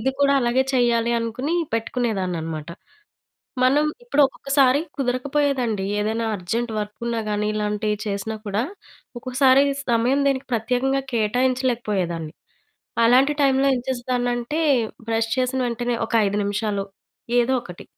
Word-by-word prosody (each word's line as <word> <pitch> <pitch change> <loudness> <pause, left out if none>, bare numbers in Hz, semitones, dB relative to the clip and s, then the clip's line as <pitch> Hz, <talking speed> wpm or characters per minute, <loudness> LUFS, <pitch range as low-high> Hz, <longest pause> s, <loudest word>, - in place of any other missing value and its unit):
ఇది 260 +4 +1
కూడా 280 0 +4
అలాగే 240 +1 +2
చేయాలి 235 -2 +2
అనుకుని 235 +7 -2 0.2
పెట్టుకునేదాన్నన్నమాట. 185 -9 -2 1.0
మనం 280 +4 +4 0.2
ఇప్పుడు 465 -12 +2
ఒక్కొక్కసారి 275 0 +2 0.2
కుదరక 255 -1 -1
పోయేదండి 255 -9 +1
ఏదైనా 220 +2 -1
అర్జెంట్ 225 +6 -2
వర్క్ 210 0 -6
ఉన్నా 235 -1 -1
గాని, 210 0 -1
ఇలాంటియి 210 0 -1
చేసినా 200 +2 -3
కూడా 205 +1 -1 0.6
ఒక్కోసారి 260 +2 +4 0.3
సమయం 240 +4 +2
దీనికి 270 -1 0
ప్రత్యేకంగా 250 +4 0
కేటాయించలేకపోయేదాన్ని. 220 - 0 0.7
అలాంటి 255 +5 +5
టైమ్‌లో 275 0 +3
ఏం - - -1
చేసేదాన్నంటే, 245 +2 -1 0.5
బ్రష్ 225 0 0
చేసిన 255 +1 0
వెంటనే, 240 +1 -2
ఒక - - -9
5 200 +1 -1
నిమిషాలు 205 0 -1 0.6
ఏదో 240 +2 +2
ఒకటి 180 -4 -10
240 Hz, 120 wpm, -22 LUFS, 210-260 Hz, 1.0 s, అలాంటి